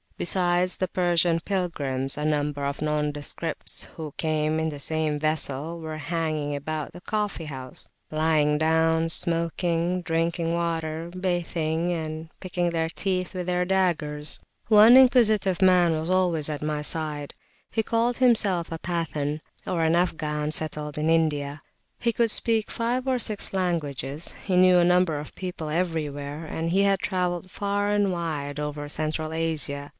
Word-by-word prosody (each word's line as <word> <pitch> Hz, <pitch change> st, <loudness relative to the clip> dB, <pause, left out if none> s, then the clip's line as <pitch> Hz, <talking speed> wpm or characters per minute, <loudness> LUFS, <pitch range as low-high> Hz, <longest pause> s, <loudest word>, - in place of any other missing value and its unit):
Besides 180 Hz, 0 st, +2 dB
the 185 Hz, -, -1 dB
Persian 175 Hz, -2 st, +2 dB
pilgrims, 145 Hz, -8 st, -1 dB
a 150 Hz, -, -4 dB
number 145 Hz, -1 st, -1 dB
of 140 Hz, 0 st, -2 dB
nondescripts 150 Hz, -1 st, -2 dB
who 155 Hz, -3 st, -7 dB
came 155 Hz, 0 st, 0 dB
in 160 Hz, 0 st, 0 dB
the 150 Hz, -, -6 dB
same 155 Hz, 0 st, 0 dB
vessel 155 Hz, +1 st, 0 dB
were 160 Hz, -1 st, -6 dB
hanging 155 Hz, -2 st, -2 dB
about 155 Hz, +1 st, -4 dB
the 175 Hz, -, -11 dB
coffee 210 Hz, -6 st, -2 dB
house; 130 Hz, -4 st, -8 dB, 0.2 s
lying 155 Hz, -1 st, +2 dB
down, 160 Hz, +1 st, +2 dB
smoking, 170 Hz, +1 st, +1 dB
drinking 165 Hz, 0 st, -1 dB
water, 165 Hz, -1 st, -2 dB
bathing 175 Hz, -2 st, -1 dB
and 160 Hz, -1 st, -4 dB
picking 175 Hz, -2 st, -1 dB
their 165 Hz, -1 st, -1 dB
teeth 185 Hz, +2 st, -2 dB
with 180 Hz, -1 st, -4 dB
their 180 Hz, 0 st, +1 dB
daggers. 165 Hz, -6 st, 0 dB, 0.3 s
One 220 Hz, +2 st, +8 dB
inquisitive 220 Hz, -8 st, +5 dB
man 180 Hz, -2 st, +5 dB
[p.217] 160 Hz, -, 0 dB
was 160 Hz, +2 st, -3 dB
always 175 Hz, -5 st, +2 dB
at 150 Hz, -2 st, -4 dB
my 150 Hz, 0 st, -2 dB
side. 150 Hz, -2 st, -2 dB, 0.4 s
He 225 Hz, -, +1 dB
called 230 Hz, +2 st, 0 dB
himself 210 Hz, -10 st, +3 dB
a 165 Hz, -, -3 dB
Pathan 155 Hz, -3 st, -3 dB, 0.2 s
(Afghan 160 Hz, -3 st, 0 dB
settled 150 Hz, -1 st, 0 dB
in 155 Hz, +1 st, 0 dB
India); 150 Hz, -3 st, 0 dB, 0.4 s
he 235 Hz, -1 st, +1 dB
could 230 Hz, +1 st, +2 dB
speak 220 Hz, 0 st, +2 dB
five 245 Hz, +3 st, -2 dB
or 260 Hz, -1 st, +2 dB
six 215 Hz, -5 st, -2 dB
languages, 155 Hz, -5 st, -2 dB
he 190 Hz, -, 0 dB
knew 180 Hz, 0 st, +6 dB
a 175 Hz, -, +5 dB
number 180 Hz, -3 st, +3 dB
of 150 Hz, -, -9 dB
people 180 Hz, -4 st, -5 dB
everywhere, 155 Hz, -3 st, -3 dB
and 165 Hz, +1 st, -3 dB
he 195 Hz, +3 st, +3 dB
had 195 Hz, -1 st, +3 dB
travelled 180 Hz, -2 st, -2 dB
far 205 Hz, +1 st, -1 dB
and 205 Hz, -2 st, +2 dB
wide 150 Hz, -5 st, -3 dB
over 150 Hz, 0 st, -4 dB
Central 155 Hz, +1 st, -2 dB
Asia. 150 Hz, -3 st, -2 dB
165 Hz, 150 wpm, -25 LUFS, 150-180 Hz, 0.4 s, One